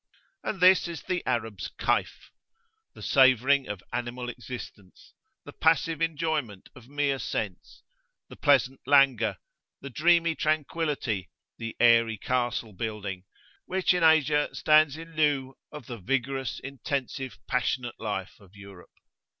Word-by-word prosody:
And 195 - -3
this 180 0 +6
is 170 -3 -7
the 180 -1 -2
Arab's 115 -5 -2
Kayf. - - -1 0.6
The - - -11
savouring 135 +1 +4
of 105 -2 -6
animal 120 0 -4
existence; 120 -5 -10 0.3
the - - -10
passive 160 0 +1
enjoyment 155 - -2
of 120 -2 -15
mere 145 -1 0
sense; 105 -5 -5 0.4
the - - -12
pleasant 135 -2 +2
languor, 130 -8 +4 0.4
the 140 - -9
dreamy 170 +4 +3
tranquillity, 150 - -1 0.3
the 115 -1 -6
airy 115 -2 +4
castle 120 -1 -2
building, 100 -2 -5 0.4
which 190 0 +2
in 180 - 0
Asia 155 -2 +4
stand 155 -2 +4
in 165 +1 -11
lieu 145 -4 +1 0.2
of 150 - -9
the 120 -3 -7
vigorous, 135 +5 -2
intensive, 135 -1 -4
passionate 125 -1 -2
life 100 -4 -5
of 100 -1 -20
Europe. 100 -2 -13
130 Hz, 125 wpm, -27 LUFS, 115-150 Hz, 0.6 s, this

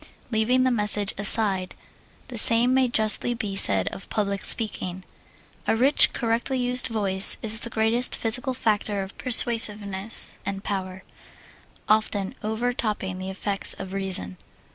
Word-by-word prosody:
Leaving 240 +4 0
the 255 - 0
message 210 -3 +1
aside, 200 -2 0 0.5
the 245 - -8
same 235 +3 +4
may 260 -1 +1
justly 225 +1 +3
be 210 -4 -6
said 95 - +4
of - - -12
public 200 -2 -4
speaking. 190 -5 0 0.6
A - - 0
rich, 265 +6 +4
correctly 235 +3 -3
used 250 0 0
voice 200 -4 +6
is 220 0 0
the 235 - -5
greatest 225 +2 0
physical 250 +4 -1
factor 210 -3 -3
of 190 - -12
persuasiveness 215 -4 +1
and 195 0 -7
power, 190 -2 -7 0.8
often 210 -2 -2
over 220 +3 -4
topping 200 -5 -5
the 190 0 -7
effects 195 +1 -4
of 190 0 -10
reason. 185 - -2
215 Hz, 140 wpm, -22 LUFS, 195-235 Hz, 0.8 s, voice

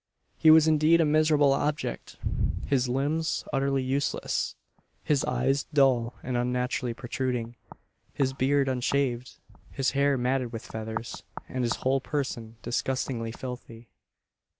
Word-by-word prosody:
He 160 - +4
was 160 0 +8
indeed 155 +2 +4
a 165 - +4
miserable 150 -2 +4
object 150 +2 -2 0.5
his 130 -3 +1
limbs 145 +5 0
utterly 135 -1 +1
useless 135 +2 -1 0.5
his 145 -3 +1
eyes 130 +3 0
dull 130 -5 +2
and 130 0 -3
unnaturally 125 0 -1
protruding 120 -1 -3 0.6
his 135 -1 0
beard 135 +1 +2
unshaved 125 -1 -1 0.3
his 135 -1 0
hair 140 0 +2
matted 125 -1 0
with 115 -2 -7
feathers 110 +1 -5 0.3
and 130 -1 -3
his 115 - +1
whole 135 +1 +2
person 130 -6 -3
disgustingly 120 -1 -2
filthy. 120 -2 -8
130 Hz, 125 wpm, -27 LUFS, 120-140 Hz, 0.6 s, was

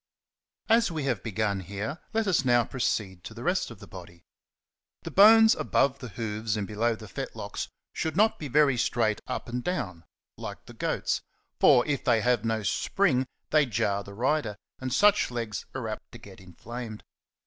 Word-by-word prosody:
As 230 -1 +4
we 155 -3 -3
have 125 -8 -1
begun 105 -2 -1
here, 100 - -5
let 225 0 0
us 180 -9 +2
now 120 -2 +4
proceed 100 -7 -2
to 115 - -9
the 120 - -8
rest 180 +3 0
of 115 - -10
the 105 - -11
body. 85 -3 -12 0.8
The - - -6
bones 220 +2 +8
above 135 0 +1
the 125 - -7
hoofs 110 +1 -3
and 105 -2 -3
belov/ 115 +2 0
the 110 - -10
fetlocks - - -5 0.3
should 160 +1 -3
not 220 +2 +3
be 150 - -5
very 140 -1 +3
straight 115 -2 +1
up - - -4
and 120 +1 -4
down, 115 - -3 0.4
like - - -7
the - - -12
goat's; - - -1 0.4
for 120 - +6
if 145 -2 -1
they 115 -3 +3
have 125 +1 +2
no 110 -1 -1
spring, 130 - +1 0.2
they 150 -2 +4
jar 100 -2 0
the 100 0 -11
rider, 125 -2 0 0.2
and 130 -1 -4
such 210 +8 +4
legs 115 -5 -4
are - - -3
apt - - -7
to - - -8
get - - -14
inflamed. 110 +5 -8
120 Hz, 180 wpm, -28 LUFS, 105-150 Hz, 0.8 s, bones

